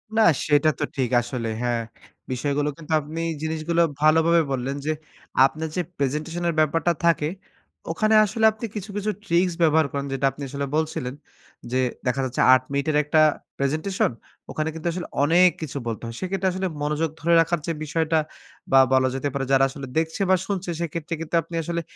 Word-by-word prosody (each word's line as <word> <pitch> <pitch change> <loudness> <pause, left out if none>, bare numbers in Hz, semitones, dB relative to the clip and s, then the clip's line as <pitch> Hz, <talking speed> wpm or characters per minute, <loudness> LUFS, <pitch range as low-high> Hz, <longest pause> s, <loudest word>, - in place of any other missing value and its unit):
না 225 - +4 0.2
সেটা 150 +1 +4
তো - - 0
ঠিক 130 -3 0
আসলে 120 -1 -4
হ্যাঁ 120 -1 0 0.5
বিষয়গুলো 145 +3 0
কিন্তু 160 -1 -10
আপনি 160 +3 -6 0.2
জিনিসগুলো 160 +2 0 0.2
ভালোভাবে 160 +2 +5
বললেন 135 +1 -2
যে 155 - +1 0.5
আপনার 155 +3 -2
যে 180 - +1 0.2
প্রেজেন্টেশন 155 +5 -2
এর 170 - +1
ব্যাপারটা 165 +3 +2
থাকে 160 -3 +3 0.6
ওখানে 215 +5 +2
আসলে 220 +2 0
আপনি 220 +2 -7
কিছু, 205 0 -5
কিছু 210 +1 -1
ট্রিকস 175 +1 +2
ব্যবহার 160 -1 +4
করেন 140 0 -3
যেটা 135 0 -1
আপনি 140 - -13
আসলে 140 0 -3
বলছিলেন। 155 -5 -2 0.6
যে 130 - +1 0.3
দেখা 130 +2 +1
যাচ্ছে 125 - -2
৮ 130 0 +4
মিনিটের 140 +2 0
একটা 155 +1 +3 0.4
প্রেজেন্টেশন 155 +5 0 0.4
ওখানে 155 +1 -2
কিন্তু 165 +1 -5
আসলে 175 0 -5 0.2
অনেক 175 +4 +6
কিছু 145 -2 -5
বলতে 115 0 -4
হয়। 115 0 -6
সেক্ষেত্রে 190 0 -1
আসলে 190 0 -1
মনোযোগ 150 +2 0
ধরে 170 +1 +2
রাখার 170 0 0 0.3
বিষয়টা 160 +1 +1 0.5
বা 135 - +7
বলা 130 0 +4
যেতে 140 +2 -1
পারে 135 -1 -2
যারা 135 0 +5
আসলে 135 -1 -8
দেখছে 160 +4 -1
বা 190 - +6
শুনছে 195 -3 -3
সেক্ষেত্রে 165 0 -4
কিন্তু 165 +1 -3
আপনি 165 +2 -9
আসলে 170 +1 -2
155 Hz, 175 wpm, -24 LUFS, 140-170 Hz, 0.6 s, বা